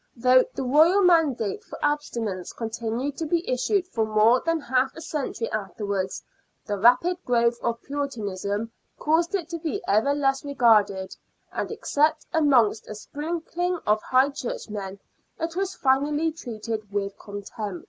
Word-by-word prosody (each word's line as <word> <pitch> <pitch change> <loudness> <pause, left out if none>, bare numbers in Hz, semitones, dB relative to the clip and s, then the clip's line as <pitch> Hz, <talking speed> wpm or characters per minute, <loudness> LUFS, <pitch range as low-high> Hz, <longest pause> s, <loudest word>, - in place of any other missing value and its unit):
Though 255 +1 +5
the - - -2
Royal 315 +10 +5
mandate 300 - +2
for - - -10
abstinence 235 -11 -2
continued 230 +4 -3
to 325 - -3
be 340 +3 0
issued 360 - +1
for 225 -10 -1
more 220 +3 +4
than 330 0 +1
half 260 -1 0
a 325 - -9
century 285 -7 -3
after 210 0 -4
wards, 190 -2 -2 0.4
the 205 -2 -3
rapid 290 - +4
growth 235 -1 +2
of 235 -1 -2
Puritanism 220 -6 -3 0.3
caused 335 +5 +1
it 350 -5 -2
to 335 -1 -4
be 330 +5 -2
ever 220 +8 +3
less 270 -2 +1
regarded, 215 -9 +2 0.4
and - - -3
except 305 +2 +1
amongst 260 -9 +3
a 215 - -6
sprinkling 335 - -3
of 210 +1 +2
High 260 +2 +3
Churchmen, 205 -7 -5 0.4
it 330 0 -3
was 385 0 -2
finally 295 +4 +2
treated 220 -7 -6
with 200 -1 -2
contempt. 205 -1 -6
255 Hz, 150 wpm, -25 LUFS, 215-310 Hz, 0.4 s, Though